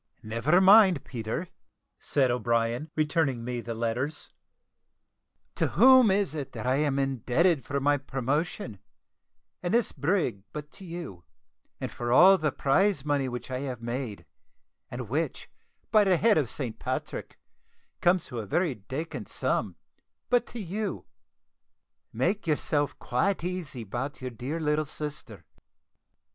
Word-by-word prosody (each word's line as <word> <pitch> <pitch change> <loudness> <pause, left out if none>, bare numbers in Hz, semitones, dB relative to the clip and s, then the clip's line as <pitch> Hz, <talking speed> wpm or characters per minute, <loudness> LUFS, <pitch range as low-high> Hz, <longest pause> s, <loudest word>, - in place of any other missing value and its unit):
"Never 115 +11 +2
mind, 190 -5 +7
Peter," 120 +8 -4 0.5
said 130 -3 +2
O'Brien, 120 +3 0
returning 150 -5 +1
me 125 -1 -3
the 115 -1 -5
letters; 120 +6 -2 1.2
"to - - 0
whom 260 -3 +7
is 195 -5 +1
it 145 -4 -5
that - - -6
I 130 +1 +2
am 145 -2 +1
indebted 135 - +1
for 140 0 -2
my 145 +1 +3
promotion, 135 - -2 0.8
and 175 - -2
this 235 - +2
brig, 145 - 0
but 150 0 -7
to 195 - -13
you 165 - -7 0.6
and - - -4
for 120 0 -3
all 185 +8 +7
the 155 -2 +1
prize 150 +3 +2
money 140 -3 +1
which 125 +1 -6
I 130 - -2
have 130 -3 -4
made, 120 -3 -4 0.6
and 120 -1 -6
which, 150 +9 -3 0.4
by 215 -2 +6
the 185 -2 +4
head 220 +4 +4
of 135 -6 -1
St. 120 -6 -5
Patrick, - - -4 0.6
comes 180 +1 +3
to 120 -3 -6
a 105 - -6
very 170 - +1
dacant 130 +4 -6
sum, - - -1 0.6
but 245 -1 +3
to 240 - -8
you? 200 +1 -4 1.1
Make 175 - -1
yourself 145 -2 0
quite 180 +9 0
easy 175 -9 -4
about 125 +7 -4
your 130 -1 -5
dear 130 +7 -4
little 150 0 +1
sister. 150 0 -7
145 Hz, 140 wpm, -28 LUFS, 125-175 Hz, 1.2 s, mind